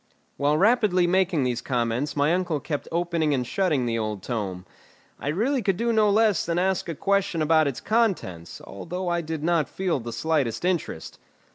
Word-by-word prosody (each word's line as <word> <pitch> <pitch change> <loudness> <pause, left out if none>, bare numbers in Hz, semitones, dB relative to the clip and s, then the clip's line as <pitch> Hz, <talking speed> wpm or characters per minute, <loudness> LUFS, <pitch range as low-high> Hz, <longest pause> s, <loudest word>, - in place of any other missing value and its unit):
While 145 +2 +1
rapidly 205 -3 +3
making 180 -4 +2
these 125 -1 -1
comments 125 +2 -1
my 145 +3 +2
uncle 175 -4 0
kept 145 0 -4
opening 170 -3 0
and 125 -2 -1
shutting 155 -4 0
the 115 -1 -1
old 105 -3 -3
tome. 100 -6 -4 0.5
I - - -6
really 235 - +1
could 195 -4 0
do 235 +2 0
no 215 -1 +4
less 210 -3 +3
than 170 0 -2
ask 185 -1 0
a 165 - -3
question 195 -1 0
about 155 0 +3
its 135 - -4
contents, 185 - -1
although 180 - -5
I 175 0 0
did 160 -2 -5
not 165 -3 +1
feel 185 -6 -1
the 120 0 -6
slightest 140 +2 -1
interest. 175 - -2
165 Hz, 180 wpm, -25 LUFS, 130-185 Hz, 0.5 s, no